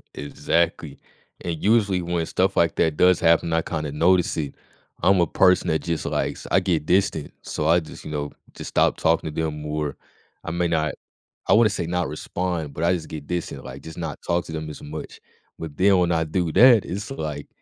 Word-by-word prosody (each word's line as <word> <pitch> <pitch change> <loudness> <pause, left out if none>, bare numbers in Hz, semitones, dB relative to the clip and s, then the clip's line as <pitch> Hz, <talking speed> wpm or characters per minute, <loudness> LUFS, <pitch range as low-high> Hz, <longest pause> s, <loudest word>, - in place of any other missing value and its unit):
Exactly, 80 +1 -1 0.4
and 85 -2 -4
usually 100 -4 +3
when 85 -1 -1
stuff 95 +4 0
like 85 -1 +3
that 80 -2 +1
does 90 -1 +5
happen, 85 0 +3
I 80 - +3
kinda 75 -3 -4
notice 85 +4 +2
it. 70 -3 -3 0.5
I'm 95 +1 +5
a 85 - +2
person 90 +4 +3
that 80 - +1
just 85 -2 -2
likes - - -2
I - - +5
get 80 -5 0
distant, 90 -5 +1
so 75 - -3
I 85 +2 +5
just, 80 - -11
you - - -6
know, 75 -1 -3 0.2
just - - -7
stop - - +2
talking 80 -1 +1
to 80 - -2
them, 75 -1 -4
or 75 -1 -3 0.5
I - - -4
may 85 +1 0
not 80 -2 0 0.5
I - - +5
wanna 110 0 +6
say 90 -4 -3
not 90 -1 -1
respond, 80 +1 -3
but 80 - -4
I 85 +2 +3
just 85 -3 -4
get 75 -2 -7
distant, 90 -1 -4
like, - - -8
just 80 - -10
not 80 -4 -5
talk 85 0 0
to - - -9
them 80 -1 -5
as 75 - -9
much. 75 +1 -8 0.4
But 80 -3 -7
then 95 +1 +5
when 90 -1 +2
I 80 -1 +2
do 80 +1 -1
that, 120 -4 +7
it's, 100 +4 -5
like, 75 - -5
85 Hz, 210 wpm, -23 LUFS, 75-90 Hz, 0.5 s, that